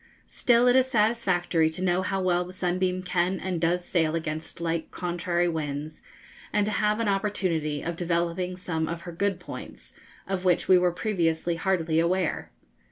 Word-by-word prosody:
Still 240 0 +3
it 245 - +5
is 260 0 +5
satisfactory 185 -8 +2
to 170 +3 -5
know 180 0 +2
how 195 +1 -1
well 180 -1 +2
the 180 +1 -10
'Sunbeam' 185 0 -1
can 180 +1 0
and 180 -3 -3
does 175 +1 +1
sail 160 -3 +1
against 160 0 -4
light 165 -1 -2
contrary 175 0 -1
winds, 155 -2 -4 0.5
and 210 -1 +2
to 215 - -1
have 210 +1 +1
an 230 - 0
opportunity 185 -7 0
of 170 0 -3
developing 175 +1 -1
some 160 -3 -2
of 170 0 -4
her 175 - -7
good 190 +2 -1
points, 180 - -10 0.3
of 190 -1 -2
which 180 -2 +2
we 185 -1 +7
were 180 0 +2
previously 170 -4 0
hardly 165 -3 +1
aware. 175 +1 0
180 Hz, 170 wpm, -27 LUFS, 165-190 Hz, 0.5 s, we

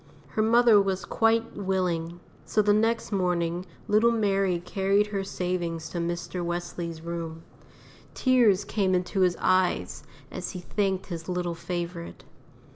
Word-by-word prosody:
Her 215 - -1
mother 225 -1 +6
was 190 -2 -2
quite 225 0 +1
willing; 180 -4 -1 0.2
so 215 - +1
the 205 0 +4
next 225 +2 +1
morning 180 -2 0 0.2
little 215 +3 +4
Mary 195 -5 +1
carried 195 +3 +1
her 195 -1 -1
savings 175 -4 -3
to 175 - -4
Mr. 175 +1 -3
Wesley's 175 -1 -4
room. 165 -1 -5 0.7
Tears 240 -7 +4
came 190 -3 +1
into 180 +2 -1
his 180 -2 +3
eyes 185 -1 +1 0.3
as - - -5
he 180 - -5
thanked 190 +1 -1
his 170 -1 -7
little 180 -1 -1
favourite. 170 0 -5
185 Hz, 135 wpm, -27 LUFS, 175-205 Hz, 0.7 s, mother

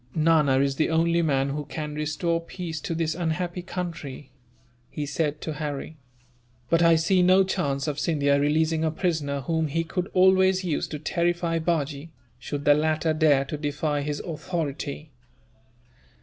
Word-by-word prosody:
"Nana 155 -4 +3
is 140 -1 0
the 155 - +2
only 170 +1 +2
man 140 -4 +1
who 150 +2 -3
can 150 +2 -5
restore 160 +3 -1
peace 165 -2 -6
to 165 - -3
this 160 -1 0
unhappy 175 +1 -2
country," 165 -7 -6 0.6
he 145 +2 -4
said 150 0 -2
to 155 - -4
Harry, 150 0 -5 0.7
"but 165 0 +4
I 165 -1 +6
see 180 +3 +3
no 185 +2 +5
chance 145 -7 -1
of 150 -1 -2
Scindia 140 -3 +2
releasing 155 +2 +1
a 160 - +2
prisoner 155 -4 -1
whom 160 +2 0
he 165 +3 -1
could 180 +3 -3
always 190 0 +4
use 165 -5 -1
to 150 - -5
terrify 170 +1 0
Bajee, 155 -2 -2 0.3
should 145 +3 -5
the 145 - +7
latter 155 +1 +1
dare 150 -3 +3
to 150 - -5
defy 145 0 -1
his 145 0 -3
authority." 155 -2 -4
155 Hz, 160 wpm, -25 LUFS, 145-170 Hz, 0.7 s, the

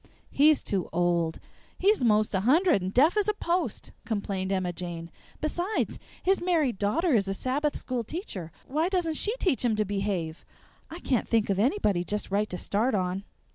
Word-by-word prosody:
"He's 300 +1 +4
too 190 -4 -2
old; 170 -1 +1 0.4
he's 405 -4 +3
most 215 -2 +3
a 190 - +2
hundred 300 - +4
and 185 +1 -3
deaf 290 - +4
as 415 -1 +2
a 425 - +1
post," 350 -2 -2
complained 195 -3 -2
Emma 185 -2 0
Jane. 170 -1 -6 0.3
"Besides, 350 +7 -1 0.2
his 385 +1 +2
married 320 - +1
daughter 300 - +1
is 200 -4 +3
a 195 - -1
Sabbath 285 +7 -1
school 250 -2 -3
teacher 215 - -6
why 310 +6 0
doesn't 355 -4 0
she 420 +9 0
teach 350 - +1
him 235 -3 +2
to 215 0 +1
behave? 195 -5 -2 0.5
I 335 +3 -9
can't 255 -4 0
think 225 -3 +2
of 195 - 0
anybody 210 - +2
just 205 +1 -4
right 210 +2 +1
to 180 - -4
start 215 +6 0
on!" 185 +1 -2
220 Hz, 180 wpm, -27 LUFS, 190-320 Hz, 0.5 s, He's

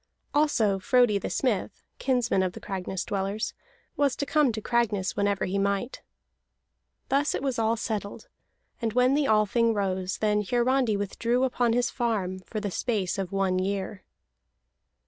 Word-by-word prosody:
Also 235 -10 +2
Frodi 245 -1 +3
the - - -4
Smith, - - -1 0.2
kinsman 245 -7 +1
of 185 -1 -1
the - - -8
Cragness 190 -1 -4
dwellers, 200 +2 -2 0.4
was 285 -3 +2
to 285 - -2
come 295 -2 +3
to 220 - -4
Cragness 215 -4 0
whenever 200 -1 +1
he 195 +2 -1
might. 200 +5 -1 1.1
Thus 280 +2 +2
it - - -3
was 265 -4 -1
all 225 +1 +2
settled; 215 -3 -4 0.5
and 225 -2 -1
when 250 +2 +4
the 290 -1 +2
Althing 220 +1 +3
rose, 190 -2 -1
then 210 -1 +1
Hiarandi 245 +1 +1
withdrew 230 +5 0
upon 245 -2 +1
his 245 0 +1
farm 205 -7 -1
for 215 +4 -6
the 205 -2 -3
space 205 -3 -1
of 190 -2 -3
one 190 -2 +1
year. 195 0 -3
215 Hz, 155 wpm, -27 LUFS, 195-245 Hz, 1.1 s, when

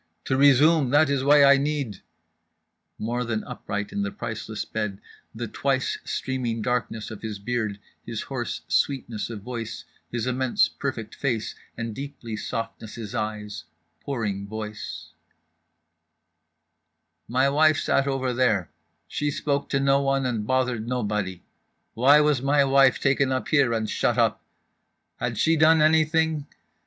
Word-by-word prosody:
To 130 - +1
resume, 140 +1 +5
that 145 +2 +4
is 135 -2 +1
why 145 +1 +6
I 140 0 +7
need…." 140 -8 -2 1.0
(more 120 +3 -2
than 110 -2 -2
upright 105 0 -5
in 205 - -2
the 200 - -1
priceless 115 - -5
bed—the 110 +2 -6
twice 135 +2 -1
streaming 120 -4 -2
darkness 120 -3 -2
of 110 - -8
his 110 -2 -5
beard, 110 -1 -2 0.2
his 115 -2 -5
hoarse 130 -4 -4
sweetness 120 -6 0
of 110 -3 -6
voice—his 120 0 -6
immense 130 0 +2
perfect 115 -6 -5
face 120 -6 -2 0.2
and 115 -1 -4
deeply 135 -4 -6
softnesses 115 -1 -5
eyes—pouring 105 - -5
voice) 110 0 -7 2.2
"my 130 +3 +2
wife 155 +2 +4
sat 135 0 +1
over 130 -2 -1
there, 110 -8 +1 0.4
she 145 - -1
spoke 140 0 -1
to 135 - +1
No 135 0 +3
one 135 -1 +1
and 115 -4 -2
bothered 125 -3 0
Nobody—why 110 - 0
was 150 -4 +2
my 140 +1 +3
wife 135 -1 +4
taken 135 0 +2 0.2
here 140 -6 +3
and 110 -1 -1
shut - - 0
up? - - +2 0.7
Had - - -3
she 165 - +3
done 160 +1 +5
anything? 155 -1 +3
125 Hz, 130 wpm, -25 LUFS, 110-140 Hz, 2.2 s, I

